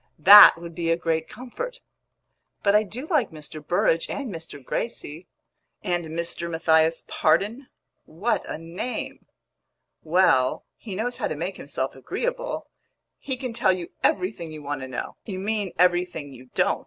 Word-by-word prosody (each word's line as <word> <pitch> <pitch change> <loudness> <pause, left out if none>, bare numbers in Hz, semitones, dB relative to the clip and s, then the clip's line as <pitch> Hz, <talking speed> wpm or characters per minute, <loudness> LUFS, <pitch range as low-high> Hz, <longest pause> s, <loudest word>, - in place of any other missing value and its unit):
"That 200 +6 +10
would 170 0 -9
be 165 0 -2
a 165 - +3
great 160 -1 -1
comfort!" 470 - -7 0.8
"But 200 - +4
I 210 - +6
do 225 +7 -6
like 300 - +1
Mr. 155 -1 -10
Burrage 165 0 +1
and 270 -7 -4
Mr. 165 -2 -8
Gracie." 175 - -4 0.6
"And 175 -4 -1
Mr. 170 +1 -4
Matthias 160 0 +2
Pardon? 215 - +1 0.4
What 195 +10 -1
a - - -3
name!" 170 +9 -6 0.7
"Well, 155 -6 +2
he 205 -5 -8
knows 240 +5 -2
how - - -1
to 155 - -4
make 175 +5 -4
himself 135 -1 -4
agreeable. - - -3 0.5
He 265 -2 -4
can 250 -2 -5
tell 195 -4 +3
you 180 -2 -6
everything 180 -3 0
you 155 -1 -9
want 145 -1 -4
to 130 - -5
know." 130 - -6
"You 195 -3 -4
mean 205 -1 -2
everything 175 -5 +1
you 130 0 -13
don't! - - +2
175 Hz, 155 wpm, -25 LUFS, 160-215 Hz, 0.8 s, That